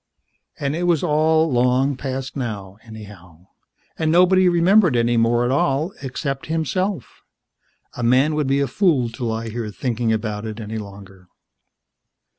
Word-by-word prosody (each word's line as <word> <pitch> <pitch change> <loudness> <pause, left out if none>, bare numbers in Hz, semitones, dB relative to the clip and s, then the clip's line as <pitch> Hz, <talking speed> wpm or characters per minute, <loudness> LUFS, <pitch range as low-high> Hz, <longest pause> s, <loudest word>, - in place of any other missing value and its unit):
And 140 +1 -2
it 175 +1 -1
was 170 -2 +2
all 160 0 +2
long 125 +3 +2
past 130 0 -5
now, 105 -6 -5
anyhow; 100 -6 -13 0.5
and 160 -1 +1
nobody 180 +2 +5
remembered 175 - +4
any 120 0 +2
more 120 +1 +2
at 125 - 0
all, 140 +6 0
except 135 0 -4
himself. 165 - -3 0.7
A - - -6
man 130 +6 +3
would 150 -2 -1
be 135 +1 +1
a 140 - 0
fool 150 - +1
to 115 +2 -8
lie 115 0 -3
here 115 -1 -5
thinking 115 +1 -2
about 110 -1 -2
it 110 0 -6
any 110 0 -5
longer. 95 -2 -12
130 Hz, 150 wpm, -21 LUFS, 110-155 Hz, 0.7 s, nobody